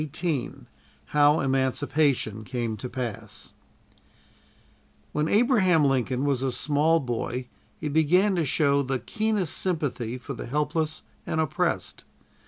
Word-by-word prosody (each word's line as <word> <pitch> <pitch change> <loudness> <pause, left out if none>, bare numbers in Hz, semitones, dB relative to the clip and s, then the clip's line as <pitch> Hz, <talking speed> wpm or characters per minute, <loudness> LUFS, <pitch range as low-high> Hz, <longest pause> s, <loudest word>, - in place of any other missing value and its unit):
CHAPTER 155 -3 -6
XVIII 155 -9 -1 0.6
HOW 150 +1 +4
EMANCIPATION 130 -3 0
CAME 120 -2 -3
TO 125 +4 -6
PASS 120 -4 -6 1.6
When 150 +1 0
Abraham 195 - +4
Lincoln 130 0 +1
was 140 -3 +1
a 135 -1 0
small 150 +5 +2
boy 125 -1 -3 0.3
he - - -4
began 170 +7 +3
to 170 - +1
show 140 0 +2
the 135 -1 -1
keenest 215 - -1
sympathy 140 -9 -2
for 130 +2 -7
the 120 - -7
helpless 150 +3 -1 0.2
and 160 - -1
oppressed. 155 -2 -1
145 Hz, 125 wpm, -26 LUFS, 130-160 Hz, 1.6 s, HOW